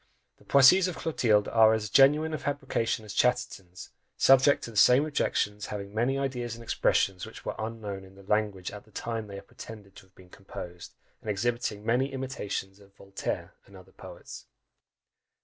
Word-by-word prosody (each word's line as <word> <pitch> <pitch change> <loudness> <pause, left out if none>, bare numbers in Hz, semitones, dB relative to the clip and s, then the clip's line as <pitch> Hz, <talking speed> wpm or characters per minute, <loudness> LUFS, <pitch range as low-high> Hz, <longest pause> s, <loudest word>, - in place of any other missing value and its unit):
The - - -23
"Poésies" 140 +8 +6
of 180 - -5
Clotilde 110 -10 +1
are 110 -1 +5
as 105 -2 -4
genuine 150 +5 +4
a 155 - -2
fabrication 135 -6 -2
as 105 - -8
Chatterton's; 120 -8 -1 0.3
subject 135 +2 +5
to 115 - -6
the - - -15
same 125 +7 +5
objections, 105 -8 -1
having 100 -1 -6
many 120 +5 0
ideas 125 -4 -3
and 115 - -11
expressions 95 -4 +1
which - - -12
were - - -2
unknown 110 -3 -5
in 95 0 -16
the 100 - -15
language 105 -2 -1
at 105 - -10
the - - -24
time 115 0 -4
they 100 -1 -8
are 100 - -10
pretended 100 -1 -12
to 95 - -15
have 95 - -36
been 90 -1 -18
composed, 90 -3 -10 0.3
and 110 - -7
exhibiting 105 0 -2
many 125 +4 +1
imitations 105 -7 -5
of 100 -1 -21
Voltaire 100 0 -5
and 100 - -15
other 95 0 -16
poets. 95 -2 -11
110 Hz, 180 wpm, -28 LUFS, 100-125 Hz, 0.3 s, Poésies